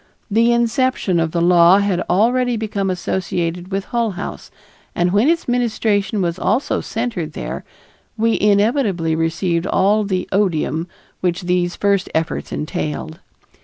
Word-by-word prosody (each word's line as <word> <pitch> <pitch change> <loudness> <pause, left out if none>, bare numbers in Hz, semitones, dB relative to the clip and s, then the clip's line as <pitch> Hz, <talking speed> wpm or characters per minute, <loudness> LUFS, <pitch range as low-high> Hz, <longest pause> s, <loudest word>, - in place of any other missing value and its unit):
The 230 +3 +4
inception 235 -5 +1
of 165 -1 +1
the 170 +1 -1
law 175 +1 +6
had 200 -3 +1
already 245 +4 +2
become 205 -3 -2
associated 180 -1 -2
with 195 +1 -2
Hull 235 -4 -1
House, - - -6 0.5
and 175 +1 +1
when 215 +9 +4
its 335 0 0
ministration 220 -4 0
was 170 +1 -2
also 225 +10 0
centered 220 -9 -3
there, - - -5 0.5
we 225 +1 +1
inevitably 205 - +2
received 170 +2 -1
all 210 +3 +2
the 185 -3 -2
odium 170 -4 0 0.3
which 180 0 -1
these 175 0 0
first 200 -2 +1
efforts 160 0 -2
entailed. 155 +2 -4
195 Hz, 135 wpm, -19 LUFS, 175-220 Hz, 0.5 s, law